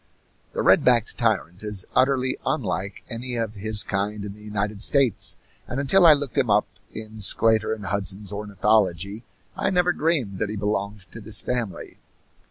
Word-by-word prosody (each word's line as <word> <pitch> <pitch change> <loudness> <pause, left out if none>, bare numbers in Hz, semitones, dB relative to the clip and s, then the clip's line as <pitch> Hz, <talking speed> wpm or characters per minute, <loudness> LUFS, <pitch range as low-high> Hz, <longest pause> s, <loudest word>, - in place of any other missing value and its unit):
The - - -2
red - - +5
backed 120 -3 +2
tyrant 110 -6 0
is 105 -3 -3
utterly 130 0 +2
unlike 95 +3 -3
any 125 +1 -5
of 115 -2 -2
his 105 +1 0
kind 100 +1 -3
in 100 - -7
the 105 - -16
United 105 -1 -4
States, 135 -6 +2 0.3
and 130 - -4
until 170 +6 +5
I 155 - +10
looked 145 -1 -1
him 130 -4 +1
up 105 0 +3 0.3
in 110 0 -9
Sclater 110 +2 +3
and 110 -2 -4
Hudson's 100 0 -3
ornithology 100 -1 0 0.3
I - - 0
never 180 -1 +2
dreamed 140 - 0
that 105 - -1
he 105 - -4
belonged 100 -1 -3
to 115 - -10
this 110 0 +1
family. 120 -5 -4
105 Hz, 170 wpm, -24 LUFS, 100-125 Hz, 0.3 s, I